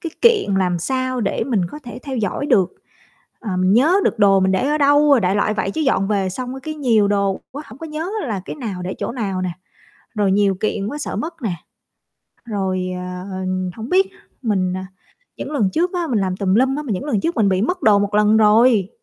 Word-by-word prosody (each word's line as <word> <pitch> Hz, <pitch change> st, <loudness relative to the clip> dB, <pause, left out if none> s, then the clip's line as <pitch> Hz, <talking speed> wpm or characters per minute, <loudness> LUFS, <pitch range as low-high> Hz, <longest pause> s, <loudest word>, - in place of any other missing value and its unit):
cái 330 Hz, -, -5 dB
kiện 440 Hz, -, +4 dB
làm 180 Hz, -2 st, +1 dB
sao 255 Hz, +6 st, -2 dB
để 200 Hz, -, -1 dB
mình 220 Hz, -8 st, +1 dB
có 300 Hz, -, -8 dB
thể 240 Hz, 0 st, -8 dB
theo 270 Hz, -2 st, -5 dB
dõi 220 Hz, +6 st, -2 dB
được. 185 Hz, -7 st, +3 dB, 0.7 s
Ờ, 195 Hz, -6 st, -3 dB
mình 185 Hz, +1 st, +2 dB
nhớ 290 Hz, -, +4 dB
được -, -, 0 dB
đồ 195 Hz, -2 st, +5 dB
mình 190 Hz, 0 st, +2 dB
để 250 Hz, +9 st, +1 dB
ở 300 Hz, +1 st, +1 dB
đâu 290 Hz, +1 st, +4 dB
rồi, 270 Hz, -4 st, +6 dB
đại 185 Hz, +1 st, +1 dB
loại 210 Hz, +1 st, +1 dB
vậy. 200 Hz, -, -1 dB
Chứ 315 Hz, -, -3 dB
dọn 195 Hz, -10 st, +1 dB
về 195 Hz, -3 st, 0 dB
xong 255 Hz, +6 st, -5 dB
cái 310 Hz, 0 st, -5 dB
nhiều 230 Hz, -8 st, +2 dB
đồ 200 Hz, -1 st, 0 dB
quá 290 Hz, +3 st, -6 dB
hổng 220 Hz, +5 st, -13 dB
có 325 Hz, -, -7 dB
nhớ 320 Hz, +4 st, -4 dB, 0.2 s
là 205 Hz, -5 st, -2 dB
cái -, -, -7 dB
nào 205 Hz, -9 st, -5 dB
để 185 Hz, +2 st, -4 dB
chỗ -, -, -3 dB
nào 195 Hz, -7 st, -3 dB
nè, 180 Hz, -, -1 dB, 0.7 s
rồi 200 Hz, -2 st, +2 dB
nhiều 200 Hz, -1 st, +2 dB
kiện 200 Hz, +1 st, -2 dB
quá 290 Hz, -, -4 dB
sợ 295 Hz, -, -4 dB
mất 330 Hz, 0 st, -5 dB
nè. 210 Hz, -7 st, -1 dB, 0.9 s
Rồi, 190 Hz, -5 st, -2 dB
ờ, 180 Hz, +1 st, -6 dB, 0.5 s
hổng 225 Hz, +2 st, -6 dB
biết 385 Hz, +1 st, +3 dB, 0.3 s
mình 190 Hz, -5 st, 0 dB
à, 185 Hz, -, -6 dB, 0.5 s
những -, -, -6 dB
lần 210 Hz, -10 st, +1 dB
trước 355 Hz, -, 0 dB
á, 350 Hz, -2 st, -1 dB
mình 225 Hz, -, +2 dB
làm 185 Hz, -1 st, -1 dB
tùm 190 Hz, -1 st, 0 dB
lum 260 Hz, +4 st, +3 dB
á 300 Hz, -, -3 dB
mà 255 Hz, -, -3 dB
những 195 Hz, +8 st, -3 dB
lần 225 Hz, -9 st, 0 dB
trước 335 Hz, -, -2 dB
mình 215 Hz, -4 st, +3 dB
bị 190 Hz, +1 st, +1 dB
mất 360 Hz, +10 st, -1 dB
đồ 205 Hz, -2 st, +5 dB
một 205 Hz, 0 st, -1 dB
lần 210 Hz, +1 st, +4 dB
rồi. 220 Hz, -1 st, +4 dB
215 Hz, 235 wpm, -20 LUFS, 195-270 Hz, 0.9 s, rồi